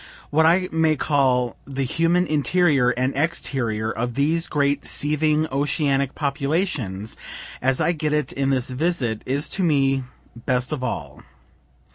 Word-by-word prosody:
what 160 +2 +4
I 180 +3 +3
may 160 -1 +2
call 130 -4 +1
the 135 0 -3
human 165 +6 +2
interior 150 -4 +2
and 130 +2 -1
exterior 120 -8 -1
of 120 +1 -3
these 160 +4 +1
great 140 -1 0
seething 150 +1 +1
oceanic 140 -1 0
populations, 140 - -2 0.5
as 130 0 +2
I - - +2
get 155 -3 -2
it 150 0 0
in 135 0 -1
this 130 -1 0
visit, 130 -6 -1
is 140 +3 -1
to 195 - -2
me 135 -5 +2 0.4
best 125 +1 0
of 145 -4 -3
all. - - -4
140 Hz, 140 wpm, -22 LUFS, 130-155 Hz, 0.5 s, what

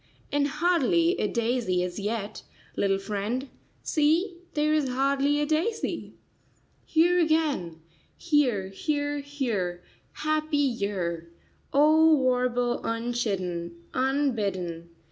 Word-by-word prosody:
And 285 0 +2
hardly 335 +2 +2
a 210 - +1
daisy 230 -6 0
as 180 +2 -4
yet, 210 0 -3 0.3
little 195 -1 +1
friend— 210 +7 -3 0.3
See, 335 +5 +1 0.2
there 305 0 +2
is 300 -4 +1
hardly 275 +3 +1
a 295 - +1
daisy. 320 +9 -2 0.7
"Here 345 +3 +3
again, 300 - 0 0.4
here, 255 - +1
here, 290 - -2
here, 230 -12 -3 0.3
happy 310 0 -1
year!" 200 - -1 0.4
O 310 +3 +6
warble 250 -2 +1
unchidden, 200 -8 -2 0.2
unbidden! 210 - -1
255 Hz, 100 wpm, -27 LUFS, 200-300 Hz, 0.7 s, O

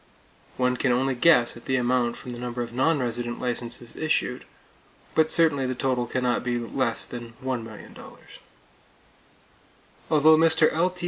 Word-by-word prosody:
One 125 0 +1
can 130 - +1
only 130 +2 +1
guess 125 -2 +4
at 120 - -13
the 130 - 0
amount 125 -1 0
from 125 - -8
the 120 - -7
number 120 0 -4
of 120 0 -9
non 145 +6 +2
resident 120 -2 -3
licenses 120 -1 -3
issued; 155 -1 -1 0.7
but 160 0 +3
certainly 155 -6 +3
the 130 - -3
total 125 -2 -1
can 125 +2 -2
not 125 -1 0
be 120 -1 -1
less 120 0 -1
than 120 -1 -8
$1,000,000. 115 -4 -5 2.2
Although 155 +1 +5
Mr. 160 -1 +4
L.T. 180 +3 0
125 Hz, 150 wpm, -25 LUFS, 120-145 Hz, 2.2 s, Although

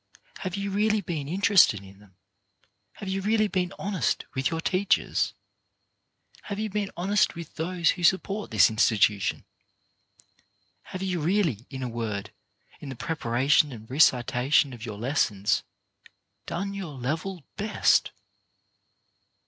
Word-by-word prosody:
Have 185 -1 -4
you 200 0 -3
really 215 +2 +2
been 160 -6 -4
interested 185 - +4
in 95 0 -15
them? 100 -3 -21 0.8
Have 200 - -9
you 190 +1 -1
really 215 +2 +2
been 185 -3 -1
honest 190 - -1
with 135 0 0
your 165 - -3
teachers? 185 +3 +1 1.1
Have 200 - -4
you 215 -1 -3
been 205 -1 -2
honest 195 +4 +2
with 170 -2 -8
those 170 +1 +1
who 180 - -6
support 195 +3 +1
this 110 -1 +5
institution? 110 -1 +2 1.4
Have 185 0 -6
you 185 -2 -1
really, 160 - 0
in 130 -2 -6
a - - -2
word, 110 -4 -4 0.5
in 145 - -8
the 130 - -6
preparation 140 +2 +1
and 110 -3 -10
recitation 130 0 +3
of 115 -2 -10
your 110 -4 -6
lessons, 105 -5 +1 0.9
done 195 +3 -3
your 185 -7 -6
level 160 +7 -3
best 210 +1 +2
160 Hz, 130 wpm, -26 LUFS, 120-195 Hz, 1.4 s, this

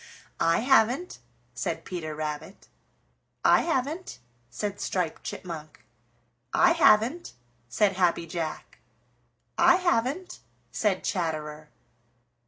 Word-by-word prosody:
"I 165 +3 +3
haven't," 265 +6 +2 0.3
said - - -4
Peter 160 -4 -5
Rabbit. 155 +5 -6 0.8
"I - - +6
haven't," 320 +3 -2 0.3
said 205 - -4
Striped 180 -4 -2
Chipmunk. 160 -4 -8 0.7
"I - - +5
haven't," 300 -1 +3 0.4
said 195 - +1
Happy 175 -2 +2
Jack. 165 -1 -5 0.8
"I - - +7
haven't," 350 -1 -1 0.3
said 200 -4 0
Chatterer. 155 -3 -3
190 Hz, 90 wpm, -27 LUFS, 160-265 Hz, 0.8 s, I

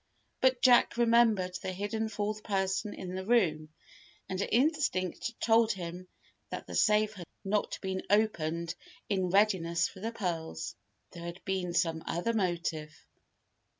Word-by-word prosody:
But 255 -1 +3
Jack 245 -2 +5
remembered 230 -6 +3
the 185 - -3
hidden 215 +3 -2
fourth 215 0 -3
person 195 0 -1
in 180 -1 -6
the 190 0 -3
room, 175 -9 +2 0.6
and 185 +1 -3
instinct 235 - 0
told 225 -1 +4
him 180 -1 -7 0.4
that - - -5
the - - -9
safe 215 0 +3
had 180 -5 -9 0.2
not 205 +1 0
been 190 0 -2
opened 170 -6 +1 0.4
in 190 -3 +1
readiness 185 -3 +3
for 195 - -13
the 225 +4 -3
pearls. 170 -6 -4 0.4
There 170 - -10
had 170 +2 -8
been 185 -3 -2
some 165 -2 +1
other 175 +8 -1
motive. 170 -6 -2
190 Hz, 140 wpm, -31 LUFS, 175-220 Hz, 0.6 s, Jack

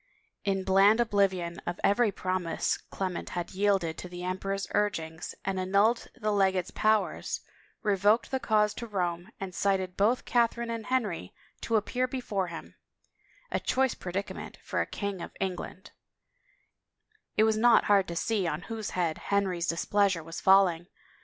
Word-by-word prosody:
In 195 -1 0
bland 195 +4 +5
oblivion 195 -6 +1
of 175 0 -3
every 215 +1 +3
promise 185 -3 -1
Clement 185 -2 -3
had 175 - -3
yielded 190 -4 +1
to 180 - -7
the 175 0 -7
emperor's 195 +2 -2
urgings 160 -6 -1
and 190 -1 -1
annulled 200 +5 +2
the 215 0 -1
legate's 190 -3 +1
powers, 215 0 +1 0.4
revoked 205 +4 +3
the 265 - 0
cause 210 -3 +2
to 235 - -6
Rome, 175 -4 -2
and 190 -1 -5
cited 190 -1 0
both 220 +5 +2
Catherine 235 -1 +1
and 230 -2 -5
Henry 210 - -1 0.3
to 230 - -1
appear 245 +4 +1
be 260 +1 -4
fore 200 -6 -2
him 170 -1 -9 0.4
— - - -48 0.3
a - - 0
choice 265 -1 +1
predicament 190 +2 -5
for - - -1
a - - -2
king 200 -3 -4
of - - -8
England 190 +1 -4
I - - -42 0.8
It 215 - +6
was 220 0 +3
not 235 +1 +5
hard 200 -2 +3
to 170 - -5
see 195 +2 0
on 170 - -2
whose 225 -1 -5
head 170 -3 0
Henry's 190 -4 0
dis 165 0 -1
pleasure 200 -5 +2
was 165 +2 -7
falling. 190 -3 +4
195 Hz, 165 wpm, -29 LUFS, 180-215 Hz, 0.8 s, It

